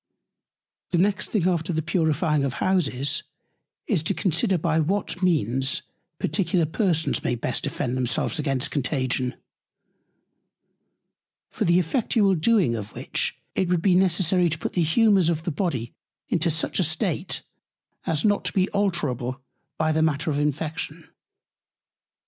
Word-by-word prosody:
The 175 - +1
next 200 +3 +1
thing 190 -5 +1
after 175 -1 0
the 160 -1 -1
purifying 155 -2 +1
of 135 -2 -1
Houses, 145 -8 0 0.6
is - - +1
to 155 - -1
consider 185 +2 +1
by 160 0 +1
what 180 +3 -1
Means 135 - +1 0.3
particular 170 +1 +1
Persons 165 0 0
may 120 - 0
best 115 - -2
defend 125 - -2
themselves 125 +4 -1
against 135 -3 -1
Contagion; 130 -3 -1 2.2
for - - -1
the 170 +1 +4
effectual 200 - +2
doing 185 - +3
of 110 -2 -6
which - - -2 0.2
it 185 - 0
would 175 -2 +1
be 195 - +4
necessary 180 -1 +3
to 160 - -2
put - - -4
the 175 - +1
Humours 190 +1 +4
of 160 -2 -1
the 175 - -2
Body 140 - -2 0.4
into 170 0 +1
such 160 +4 0
a - - +4
State, 170 +2 -1 0.6
as 160 -1 0
not 205 -1 +2
to - - -1
be 190 -1 +2
alterable 145 - -1 0.4
by 155 0 +1
the 155 0 +1
Matter 155 0 +1
of 145 - -1
Infection. 150 +2 -3
160 Hz, 145 wpm, -24 LUFS, 145-185 Hz, 2.2 s, the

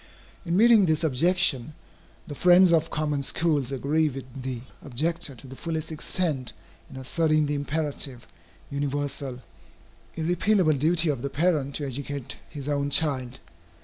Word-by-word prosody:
In 170 +2 +1
meeting 225 -3 +6
this 155 0 +1
objection, 155 -2 +2 0.5
the 145 - -7
friends 180 +3 +6
of 165 0 +2
common 150 -2 -1
schools 145 -2 0
agree 150 +4 +1
with 135 -1 -7 0.2
the 130 -2 -4 0.2
objector 155 +3 -2
to 130 - -14
the 135 0 -10
fullest 160 +1 -4
extent 150 -6 -2 0.4
in - - -12
asserting 155 +3 +1
the 145 - -1
imperative, 145 -3 -3 0.5
universal, 140 -2 -3 0.8
irrepealable 175 +1 +2
duty 165 +2 +3
of 135 -5 -1
the 140 - -3
parent 150 -3 0
to 145 - -1
educate 140 0 -5
his 145 -3 -7
own 145 -1 0
child. 135 -4 +1
145 Hz, 140 wpm, -26 LUFS, 135-165 Hz, 0.8 s, meeting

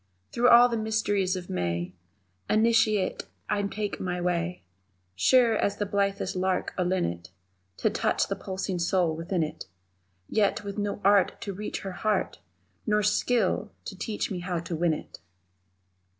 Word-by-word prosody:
Through 245 +1 +3
all 240 +1 +8
the 235 -2 -2
mysteries 205 -4 0
of 180 -1 -6
May, 85 0 -2 0.6
Initiate, 220 -3 +2 0.2
I 205 0 0
take 205 0 -3
my 180 -1 -2
way 175 0 -1 0.5
Sure 235 - +4
as 200 - 0
the 205 - -1
blithest 200 -1 -1
lark 185 0 -1
or 180 - 0
linnet 90 - -1 0.5
To - - +2
touch - - +1
the - - -2
pulsing 190 -1 -4
soul 170 -1 +1
within 170 +1 -1
it 150 - -6 0.6
Yet 205 -1 +1
with 200 0 -5
no 205 0 -2
art 200 -1 +4
to 200 - -4
reach 210 +3 -5
Her 195 - -5
heart, 210 +2 -1 0.5
Nor 210 0 +2
skill 210 0 +1 0.2
to 195 - -6
teach 210 +3 -3
me 185 - -3
how 180 0 -3
to 170 0 -4
win 165 -1 +2
it! - - -10
195 Hz, 155 wpm, -27 LUFS, 180-210 Hz, 0.6 s, all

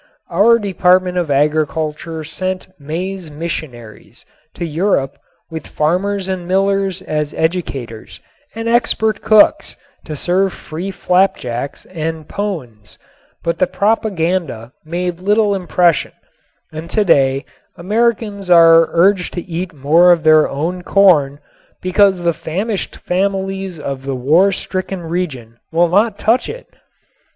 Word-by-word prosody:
Our 210 +7 +5
Department 185 -3 +2
of 170 -4 -2
Agriculture 155 +2 -1
sent 185 +5 -4
maize 175 +4 -5
missionaries 145 -8 -7 0.3
to 170 - -4
Europe 160 -4 -1 0.3
with 160 -3 -7
farmers 185 +5 -1
and 185 -2 -4
millers 195 0 0
as 150 -1 -3
educators 140 -9 -3 0.4
and 225 0 -4
expert 230 -2 +1
cooks 215 -1 +4 0.3
to 155 - -6
serve 185 +5 0
free 170 +5 -7
flapjacks 180 -10 -1
and 160 -2 -5
pones, 125 - -6 0.5
but 170 0 -2
the 185 - +3
propaganda 180 - -1
made 175 +2 -3
little 205 +2 +2
impression 175 -3 +1 0.6
and 160 +2 -8
today 140 -10 +2 0.3
Americans 210 0 -1
are 165 -1 +7
urged 180 +2 +2
to 175 - -4
eat 175 +1 -5
more 160 +4 +4
of 170 -2 +2
their 155 0 +5
own 165 +6 -3
corn 175 -8 +3 0.4
because 185 0 +2
the 170 0 +2
famished 195 +7 -4
families 195 -1 -2
of 140 -2 -5
the 135 0 -4
war 160 +10 +3
stricken 185 -1 -4
region 145 -10 -4
will 170 +1 +2
not 205 +4 +2
touch 230 +4 +1
it. - - -8
175 Hz, 120 wpm, -17 LUFS, 155-195 Hz, 0.6 s, are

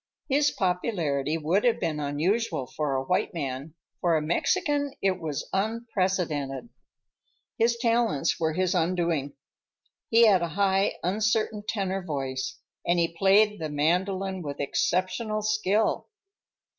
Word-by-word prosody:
His 290 +1 +3
popularity 170 - -1
would 165 +6 +1
have 240 -2 +3
been 160 -3 -1
unusual 155 - 0
for 140 +2 -2
a 130 - 0
white 180 +4 0
man, 140 0 -4 0.2
for 170 -2 +2
a - - 0
Mexican 285 - 0
it 190 -1 +1
was 155 -4 -4
unprecedented. 185 - -1 0.9
His 235 +1 +3
talents 230 - +1
were 160 -1 0
his 185 +2 +1
undoing. 170 -5 0 0.8
He 230 +1 +6
had 195 -5 +5
a 170 - 0
high, 195 0 +2
uncertain 215 +3 0
tenor 195 -2 -1
voice, 135 -5 -3 0.3
and 175 - +2
he 170 -1 0
played 205 +3 +4
the 155 -1 -3
mandolin 185 +5 0
with 145 -3 -6
exceptional 185 - 0
skill. 215 0 +1
185 Hz, 130 wpm, -27 LUFS, 155-215 Hz, 0.9 s, He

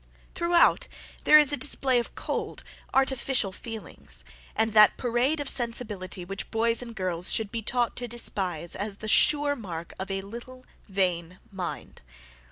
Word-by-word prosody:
Throughout 340 -1 +3 0.4
there 305 - +8
is 295 -2 +4
a - - +2
display 265 -3 +2
of 235 - -6
cold, - - -4 0.3
artificial 265 -5 +2
feelings, 225 +3 -6 0.3
and 220 -1 +1
that 215 -1 +6
parade 250 +5 0
of 290 - -3
sensibility 210 -8 -1
which 195 +2 -6
boys 230 +1 +1
and 235 -2 -9
girls 180 -2 0
should 220 -3 +2
be 230 -1 -3
taught 240 +2 -1
to 245 - -3
despise 185 -8 -1
as 200 0 -4
the 215 - -7
sure 290 +5 +4
mark 170 -8 -7
of 190 - -4
a 195 0 -3
little 240 +5 -10 0.2
vain 180 -2 -1
mind. 185 -3 -6
225 Hz, 155 wpm, -26 LUFS, 195-255 Hz, 0.4 s, there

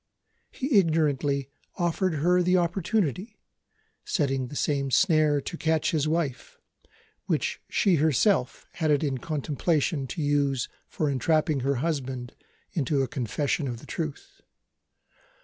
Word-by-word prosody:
He 255 -5 +2
ignorantly 145 -5 +1 0.3
offered 175 0 0
her 180 +5 +3
the 180 +1 +3
opportunity 190 - -1 0.7
setting 135 -7 0
the 145 - -9
same 140 -1 0
snare 155 -2 +3
to 170 - -6
catch 160 -1 +1
his 155 -2 +1
wife, 155 -6 -2 0.7
which - - -1
she 185 -4 +3
herself 155 - +2
had 160 -3 -1
it 145 0 +3
in 135 -3 -1
contemplation 150 0 -1
to 155 - -4
use 140 -3 +1 0.2
for 155 - -2
entrapping 150 +2 +1
her 135 +2 0
husband 130 -6 -3 0.4
into 140 -4 0
a - - -1
confession 140 +4 -1
of 120 -2 -4
the - - -13
truth. 155 -4 -6
150 Hz, 130 wpm, -27 LUFS, 140-170 Hz, 0.7 s, her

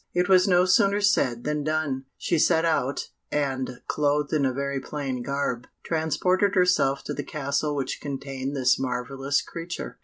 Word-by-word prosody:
It 180 0 +2
was 185 -1 +5
no 180 -1 +4
sooner 200 +2 +4
said 130 - +2
than 150 0 -1
done. 150 -3 -1
She 170 - 0
set 165 +1 +3
out, 145 -4 0 0.2
and, 130 -3 -2
clothed 145 0 0
in 145 -3 +2
a - - 0
very 140 +1 -2
plain 135 -2 -4
garb, 125 -2 -2 0.2
transported 180 +5 +1
herself 180 -7 +3
to - - -4
the - - -4
castle 145 0 -2
which 135 -2 -3
contained 135 -1 -4
this 130 -2 +3
marvellous 135 +2 -1
creature. 165 0 -7
145 Hz, 160 wpm, -25 LUFS, 135-165 Hz, 0.2 s, was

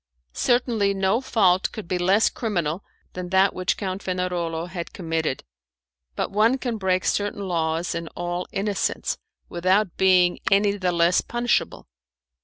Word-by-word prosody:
Certainly 230 - +1
no 195 +5 +1
fault 190 -8 +2
could 215 -5 -8
be 180 +1 -1
less 195 +5 +4
criminal 175 -6 -2 0.3
than 180 -1 -6
that 190 +1 +3
which 185 0 -1
Count 190 0 -4
Fenarolo 175 -3 -2
had 175 -1 -6
committed, 160 -5 -2 0.7
but - - -2
one 220 +6 +3
can 240 -4 -3
break 185 -1 +1
certain 205 -1 -1
laws 165 -1 -1
in 170 0 -4
all 175 +1 -3
innocence 200 0 -1 0.3
without 185 +2 +1
being 185 -2 +4
any 200 +1 +4
the 185 -3 0
less 170 +1 +3
punishable. 240 0 -1
185 Hz, 140 wpm, -24 LUFS, 175-205 Hz, 0.7 s, less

